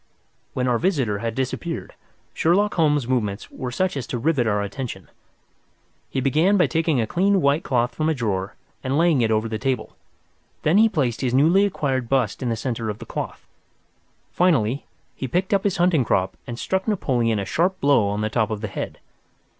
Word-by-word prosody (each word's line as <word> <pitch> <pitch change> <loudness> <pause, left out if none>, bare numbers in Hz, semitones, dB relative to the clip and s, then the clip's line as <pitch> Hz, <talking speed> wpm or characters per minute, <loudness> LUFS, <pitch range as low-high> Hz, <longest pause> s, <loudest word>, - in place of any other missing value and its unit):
When 125 0 0
our 120 -2 +2
visitor 135 - 0
had 115 0 -3
disappeared, 135 +6 -3 0.4
Sherlock 200 +6 +2
Holmes's 150 -6 +2
movements 110 -5 -2
were 130 -2 -5
such 185 +8 -1
as 135 - -4
to 125 - -3
rivet 135 -2 +1
our 105 -1 +1
attention. 120 +5 -6 1.0
He - - -2
began 155 +10 +3
by 180 - +5
taking 160 -2 +1
a 115 - +1
clean 195 - +2
white 145 0 +2
cloth 120 -2 0
from 155 +3 0
a 160 - +1
drawer 100 -6 -2 0.3
and 130 +2 0
laying 165 -5 +3
it 115 - +2
over 110 0 +1
the 110 -1 -4
table. 130 0 -2 0.7
Then 170 +7 +4
he 225 +1 +6
placed 135 - -1
his 125 -2 0
newly 170 +9 +5
acquired 135 -10 -1
bust 130 -5 +1
in 125 - -1
the 115 - 0
centre 115 -1 -3
of 105 - -4
the - - -9
cloth. - - -6 0.9
Finally, 140 -8 +1 0.3
he 135 - -4
picked 180 - 0
up 195 - +2
his 200 -3 0
hunting 175 -6 +3
crop 95 -4 0
and 120 - -5
struck 190 - -2
Napoleon 125 - +1
a 100 - -2
sharp 185 - 0
blow 140 -7 +3
on 105 +1 -2
the 110 - 0
top 110 -3 +1
of 110 -2 -4
the 105 - -3
head. - - -5
130 Hz, 195 wpm, -23 LUFS, 115-165 Hz, 1.0 s, he